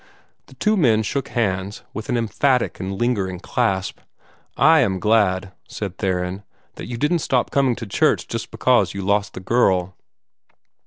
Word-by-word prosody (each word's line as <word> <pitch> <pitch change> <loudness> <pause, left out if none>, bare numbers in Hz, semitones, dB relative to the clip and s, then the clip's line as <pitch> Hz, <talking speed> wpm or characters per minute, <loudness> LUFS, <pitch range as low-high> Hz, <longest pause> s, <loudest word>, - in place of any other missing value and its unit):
The - - -17
two 215 +1 +1
men 115 - +3
shook 135 +5 -2
hands, 100 -3 -2
with 110 +1 -7
an 125 - +1
emphatic 125 +3 0
and 95 +1 -4
lingering 100 -7 -1
clasp. 100 -3 -1 0.6
"I 160 0 +6
am 95 -9 +1
glad," 100 -3 +2 0.2
said 100 -4 -6
Theron, 90 0 -2 0.3
"that - - -8
you 120 - -5
didn't 155 +7 +1
stop 130 -4 0
coming 135 -3 +2
to 115 - -7
church 100 - +1
just - - -5
because - - +2
you 100 - -4
lost 100 +1 0
the - - -5
girl." 95 -4 +1
105 Hz, 160 wpm, -21 LUFS, 95-125 Hz, 0.6 s, I